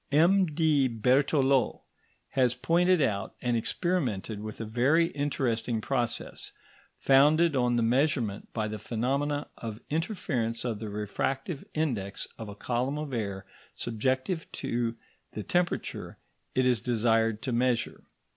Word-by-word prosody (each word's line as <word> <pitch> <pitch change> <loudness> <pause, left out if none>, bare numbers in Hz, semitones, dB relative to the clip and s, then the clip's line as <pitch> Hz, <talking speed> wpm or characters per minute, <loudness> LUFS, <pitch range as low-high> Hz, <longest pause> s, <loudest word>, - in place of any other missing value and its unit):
M.D. 160 -3 +4
Berthelot 130 +3 +2 0.5
has 125 -2 +2
pointed 170 +6 +3
out 100 -6 -1
and 120 -1 0
experimented 115 - -1
with 110 0 -7
a 115 - -3
very 135 +10 +3
interesting 125 -5 -1
process, 120 0 -2 0.5
founded 150 +4 +5
on 125 -2 +2
the 120 - +2
measurement 125 -3 +1
by 110 -2 -1
the 110 0 -5
phenomena 140 +7 -1
of 110 -2 -6
interference 145 - -1
of 115 -4 -2
the 110 -1 -5
refractive 130 - -3
index 115 -11 -1
of 110 -2 -6
a 100 - -8
column 125 +6 -1
of 150 -3 -5
air 100 -4 -3 0.3
subjected 130 - -1
to 115 -1 -1 0.4
the 105 - -4
temperature 175 - -1 0.4
it 130 - +3
is 125 -3 +2
desired 115 -2 +1
to 130 - -2
measure. 120 0 0
125 Hz, 125 wpm, -29 LUFS, 115-145 Hz, 0.5 s, founded